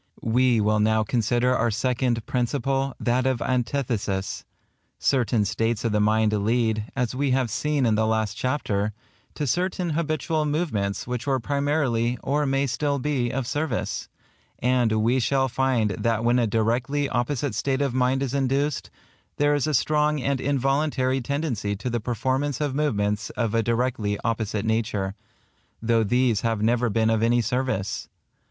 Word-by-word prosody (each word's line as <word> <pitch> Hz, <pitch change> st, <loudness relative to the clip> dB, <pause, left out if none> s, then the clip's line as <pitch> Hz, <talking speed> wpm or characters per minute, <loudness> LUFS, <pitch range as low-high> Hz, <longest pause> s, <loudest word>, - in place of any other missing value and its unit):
We 120 Hz, +1 st, +3 dB
will 105 Hz, 0 st, +2 dB
now 110 Hz, +1 st, +3 dB
consider 120 Hz, +3 st, +1 dB
our 120 Hz, -, +1 dB
second 120 Hz, 0 st, 0 dB
Principle, 135 Hz, +2 st, -1 dB
that 125 Hz, +2 st, +1 dB
of 130 Hz, -2 st, +1 dB
Antithesis. 115 Hz, -6 st, -1 dB, 0.5 s
Certain 120 Hz, -5 st, +1 dB
states 115 Hz, +3 st, -1 dB
of 115 Hz, -, +1 dB
the 105 Hz, -, +2 dB
mind 110 Hz, +1 st, +2 dB
lead, 110 Hz, +1 st, +1 dB
as 125 Hz, -3 st, -1 dB
we 140 Hz, +2 st, 0 dB
have 125 Hz, -4 st, -1 dB
seen 150 Hz, 0 st, 0 dB
in 115 Hz, -, +3 dB
the 110 Hz, +1 st, +2 dB
last 110 Hz, -2 st, 0 dB
chapter, 110 Hz, -5 st, -1 dB, 0.4 s
to 150 Hz, -, -2 dB
certain 175 Hz, +4 st, -1 dB
habitual 155 Hz, 0 st, -1 dB
movements 145 Hz, -, -1 dB
which 125 Hz, +2 st, -4 dB
were 135 Hz, -1 st, +2 dB
primarily, 140 Hz, -3 st, 0 dB
or 145 Hz, +2 st, +1 dB
may 135 Hz, +1 st, +1 dB
still 140 Hz, +3 st, -1 dB
be, 135 Hz, -3 st, -1 dB
of 130 Hz, +1 st, -2 dB
service; 150 Hz, +5 st, -2 dB, 0.5 s
and 125 Hz, -2 st, +2 dB
we 120 Hz, +3 st, +3 dB
shall 130 Hz, +2 st, +2 dB
find 125 Hz, -4 st, +1 dB
that 115 Hz, +3 st, -1 dB
when 120 Hz, +1 st, +3 dB
a 120 Hz, -, +2 dB
directly 120 Hz, +7 st, 0 dB
opposite 135 Hz, +3 st, -1 dB
state 135 Hz, 0 st, 0 dB
of 135 Hz, -3 st, -1 dB
mind 130 Hz, +1 st, +1 dB
is 135 Hz, -1 st, -3 dB
induced, 140 Hz, +1 st, 0 dB, 0.5 s
there 145 Hz, 0 st, +3 dB
is 145 Hz, 0 st, +1 dB
a 155 Hz, -, 0 dB
strong 150 Hz, +3 st, +2 dB
and 135 Hz, 0 st, -1 dB
involuntary 135 Hz, -1 st, +1 dB
tendency 125 Hz, -6 st, -2 dB
to 120 Hz, +5 st, -4 dB
the 120 Hz, -, 0 dB
performance 130 Hz, +4 st, -1 dB
of 145 Hz, -3 st, -1 dB
movements 105 Hz, -9 st, 0 dB
of 115 Hz, -3 st, 0 dB
a 115 Hz, -, +3 dB
directly 115 Hz, -3 st, 0 dB
opposite 110 Hz, -2 st, -1 dB
nature, 105 Hz, -3 st, -1 dB, 0.7 s
though 115 Hz, 0 st, +2 dB
these 120 Hz, 0 st, +2 dB
have 115 Hz, -2 st, 0 dB
never 120 Hz, +1 st, +2 dB
been 110 Hz, +1 st, +2 dB
of 110 Hz, -1 st, +1 dB
any 120 Hz, +1 st, +3 dB
service. 120 Hz, -4 st, -2 dB
125 Hz, 160 wpm, -25 LUFS, 110-135 Hz, 0.7 s, We